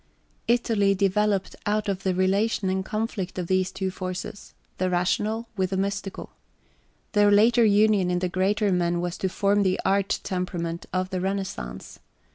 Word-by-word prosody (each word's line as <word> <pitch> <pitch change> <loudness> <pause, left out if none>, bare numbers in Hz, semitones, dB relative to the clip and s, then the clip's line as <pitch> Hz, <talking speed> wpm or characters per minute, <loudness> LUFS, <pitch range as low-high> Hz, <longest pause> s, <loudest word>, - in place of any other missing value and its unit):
Italy 220 -4 +2
developed 200 0 +1
out 210 +1 0
of 195 -1 -2
the 190 -2 0
relation 195 +1 +1
and 190 0 -1
conflict 215 -3 -3
of 180 - -2
these 185 +1 +1
two 190 -1 -3
forces 185 +2 -6 0.2
the 185 0 +1
rational 210 +6 0
with 190 -2 0
the 190 - -2
mystical. 195 0 -3 0.8
Their 205 -1 +4
later 225 +4 +5
union 205 -3 +4
in 180 - +1
the 180 +1 0
greater 195 +3 +1
men 175 -1 +1
was 175 0 -2
to 190 - 0
{x} 185 - -8
form 200 +1 +2
the 190 -2 +1
art 195 0 +1
temperament 175 -3 -3
of 185 +1 -1
the 185 -1 -2
Renaissance. 190 - -4
190 Hz, 165 wpm, -25 LUFS, 185-205 Hz, 0.8 s, later